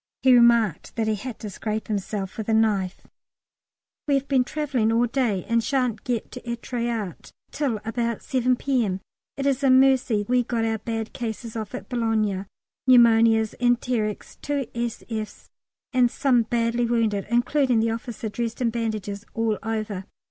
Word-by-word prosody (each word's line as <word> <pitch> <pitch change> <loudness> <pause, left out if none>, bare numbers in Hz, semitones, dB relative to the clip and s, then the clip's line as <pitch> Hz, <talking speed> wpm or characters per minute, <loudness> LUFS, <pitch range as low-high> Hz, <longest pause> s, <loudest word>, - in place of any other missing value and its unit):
He 260 -1 +6
remarked 235 -7 +4
that 225 - 0
he 220 - +2
had 225 +3 -5
to 215 - -5
scrape 215 +2 -4
himself 200 -2 -3
with 220 0 -5
a 220 - +3
knife. 200 -4 +1 1.0
We 285 - +3
have 275 0 -1
been 265 -3 +3
travelling 270 -6 0
all 230 +2 +3
day, 235 -6 0
and 230 0 +1
shan't 250 -5 0
get 240 -3 -2
to 250 - -8
Êtretat 235 -4 -4 0.2
till 260 -8 -1
about 235 0 -2
7 255 -1 +1
P.M. 235 -8 0 0.4
It 275 - -2
is 280 0 +1
a 270 - +4
mercy 260 -5 +4
we 250 0 +3
got 230 -1 -1
our 225 -1 -1
bad 225 0 -4
cases 230 -1 -5
off 215 -2 -5
at 195 - -7
Boulogne 215 -5 0 0.4
pneumonias, 225 -3 +5
enterics, 240 -3 -1
two 285 -2 -1
s.f.'s, 230 -2 -5 0.4
and 250 -1 +4
some 250 -1 +2
badly 235 0 +1
wounded, 225 -4 0
including 245 +1 +2
the 225 0 +1
officer 230 0 -5
dressed 230 +2 -3
in 240 -2 +1
bandages 215 -3 -3
all 225 -2 0
over. 215 -4 -3
230 Hz, 160 wpm, -24 LUFS, 215-245 Hz, 1.0 s, He